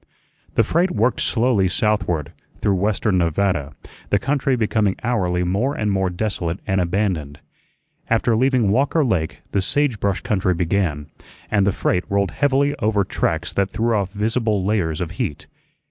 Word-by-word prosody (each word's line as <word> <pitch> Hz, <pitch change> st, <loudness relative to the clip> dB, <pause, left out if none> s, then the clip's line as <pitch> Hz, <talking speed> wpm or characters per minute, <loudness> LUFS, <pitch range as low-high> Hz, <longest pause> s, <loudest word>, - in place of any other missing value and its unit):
The 115 Hz, -, +4 dB
freight 170 Hz, -, +1 dB
worked 115 Hz, -3 st, +1 dB
slowly 115 Hz, -5 st, +2 dB
southward, 90 Hz, -6 st, 0 dB, 0.3 s
through 100 Hz, -, +1 dB
western 95 Hz, 0 st, +1 dB
Nevada, 85 Hz, -4 st, 0 dB, 0.4 s
the 100 Hz, -, +3 dB
country 135 Hz, +2 st, 0 dB
becoming 110 Hz, -4 st, +1 dB
hourly 90 Hz, -7 st, 0 dB
more 105 Hz, +11 st, 0 dB
and 105 Hz, -1 st, -1 dB
more 95 Hz, -1 st, +1 dB
desolate 90 Hz, -2 st, -3 dB
and 95 Hz, -2 st, +1 dB
abandoned. 85 Hz, -6 st, -1 dB, 0.7 s
After 115 Hz, 0 st, +2 dB
leaving 125 Hz, -3 st, +2 dB
Walker 140 Hz, +6 st, +2 dB
Lake 85 Hz, -9 st, -1 dB
the 100 Hz, -, +1 dB
sage 130 Hz, +3 st, 0 dB
brush 100 Hz, -2 st, 0 dB
country 95 Hz, -3 st, 0 dB
began, 85 Hz, -4 st, -1 dB, 0.4 s
and 100 Hz, -2 st, +3 dB
the -, -, +4 dB
freight 90 Hz, -1 st, 0 dB
rolled 100 Hz, 0 st, +1 dB
heavily 140 Hz, 0 st, +2 dB
over 105 Hz, -1 st, +1 dB
tracks 85 Hz, -2 st, -2 dB
that 100 Hz, 0 st, +1 dB
threw 115 Hz, 0 st, 0 dB
off 100 Hz, -2 st, -1 dB
visible 105 Hz, -1 st, 0 dB
layers 90 Hz, -7 st, 0 dB
of 85 Hz, -1 st, -3 dB
heat. 75 Hz, -, -3 dB
100 Hz, 155 wpm, -21 LUFS, 90-115 Hz, 0.7 s, The